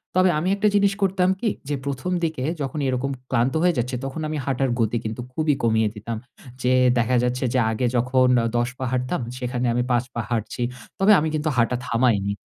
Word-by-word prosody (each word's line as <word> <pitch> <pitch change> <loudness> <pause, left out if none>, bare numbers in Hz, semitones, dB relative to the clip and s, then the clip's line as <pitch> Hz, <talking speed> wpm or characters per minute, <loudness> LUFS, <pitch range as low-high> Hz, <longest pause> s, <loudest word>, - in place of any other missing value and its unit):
তবে 185 0 +5
আমি 170 - -1
একটা 205 +1 +2
জিনিস 200 -1 +4
করতাম 190 -1 +2
কী? 225 - +1 0.2
যে 145 - 0
১ম 140 +5 -3
দিকে 160 -6 -1 0.2
যখন 140 +2 -3
এরকম 130 +1 -1 0.2
ক্লান্ত 130 +1 +1
হয়ে 180 0 +4
যাচ্ছি, 125 +2 -1
তখন 135 +4 -5
আমি 155 0 -3
হাঁটার 135 -1 0
গতি 115 +1 +1
কিন্তু 110 +2 -4
খুবই 155 +1 +1
কমিয়ে 110 -2 +3
দিতাম। 110 +2 -5 0.5
যে 125 - +3 0.3
দেখা 120 +2 +2
যাচ্ছে 125 +2 -1
যে 130 - +3
আগে 110 +3 -1
যখন 125 +1 +3 0.3
১০ 120 +1 +1
পা 130 - -3
হাঁটতাম, 130 +5 -1 0.2
সেখানে 125 0 -2
আমি 125 - +1
৫ 120 0 +2
পা 120 - -1
হাঁটছি। 115 +1 -3 0.4
তবে 200 +2 +5
আমি 155 - 0
কিন্তু 155 +1 0
হাঁটা 120 +1 +2
থামাইনি 115 -5 +1
130 Hz, 195 wpm, -23 LUFS, 120-155 Hz, 0.5 s, তবে